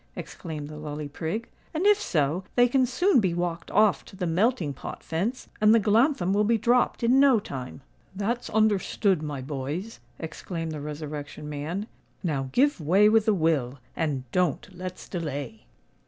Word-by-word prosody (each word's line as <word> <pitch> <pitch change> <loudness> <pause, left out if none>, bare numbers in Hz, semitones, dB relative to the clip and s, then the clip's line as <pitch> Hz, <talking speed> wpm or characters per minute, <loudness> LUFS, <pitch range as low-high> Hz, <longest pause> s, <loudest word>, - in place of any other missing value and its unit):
exclaimed 150 -3 -6
the 150 0 -9
Lully 150 0 -5
Prig; 165 +10 -4 0.3
"and, 335 +5 0
if 415 0 +5
so, 155 - 0
they 245 0 +6
can 255 +1 +2
soon 305 +6 +3
be 185 -5 +1
walked 170 -1 -3
off 210 -1 +3
to - - -13
the 185 -2 -3
melting 175 - +1
pot 135 - -8
fence, 200 +11 -2
and 215 +1 +6
the - - +6
glanthem 215 - +3
will 205 +1 +3
be 230 +2 +3
dropped 240 +2 +2
in 250 +3 +5
no 270 -5 +6
time." 130 - -7 0.3
"That's 230 +5 -2
understood, 205 -4 +2
my 145 -3 -4
boys," 145 - -5 0.2
exclaimed 165 0 -5
the 150 -2 -5
Resurrection 150 0 -6
Man. 150 +7 -4 0.4
"Now, 140 -6 -1
give 280 - +2
way 190 +7 +5
with 220 0 +3
a 215 - +5
will, 150 -7 +1 0.2
and 145 -5 -1
don't 180 -6 0
let's 185 0 -7
delay." 140 - -5
180 Hz, 170 wpm, -26 LUFS, 150-220 Hz, 0.4 s, they